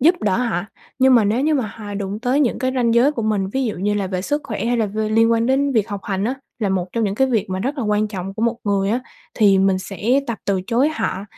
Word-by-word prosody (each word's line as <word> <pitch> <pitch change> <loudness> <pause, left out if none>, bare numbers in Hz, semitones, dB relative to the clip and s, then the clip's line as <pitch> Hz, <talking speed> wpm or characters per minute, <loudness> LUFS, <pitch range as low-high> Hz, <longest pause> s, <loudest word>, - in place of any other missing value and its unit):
giúp 325 +7 +5
đỡ 200 -3 +2
họ, 235 -7 0 0.4
nhưng 260 0 +5
mà 230 -4 +5
nếu 215 +5 +1
như 305 +2 +2
mà 255 -6 0
họ 205 -1 -8
đụng 200 +1 -4
tới 255 +4 +1
những 260 -5 +1
cái 260 0 -1
ranh 235 -2 +2
giới 255 +6 +4
của 230 - -3
mình, 205 -3 0
ví 265 +6 -1
dụ 220 - -2
như 205 +3 -1
là 200 -2 -1
về 185 -1 -3
sức 290 +6 -1
khỏe 215 -1 -4
hay 240 +1 +1
là 225 -2 +1
v 205 - -9
liên 225 +1 +4
quan 230 0 +1
đến 275 +2 +2
việc 220 -2 +1
học 205 -2 -4
hành 195 0 -2
á, 250 - 0 0.2
là 210 -4 0
một 185 -2 0
trong 230 -2 0
những 195 - -1
cái 265 +5 +2
việc 230 -6 0
mà 185 - -2
rất 275 +6 -2
là 245 - -1
quan 210 0 +1
trọng 195 -1 -6
của 220 - -4
một 235 0 +1
người 200 -1 +1
á, 240 +3 0 0.3
thì 200 -3 +4
mình 190 -1 +3
sẽ 205 +8 0
tập 235 -3 -3
từ 195 -2 0
chối 245 +5 +2
họ 205 -10 -3
220 Hz, 295 wpm, -20 LUFS, 200-250 Hz, 0.4 s, giúp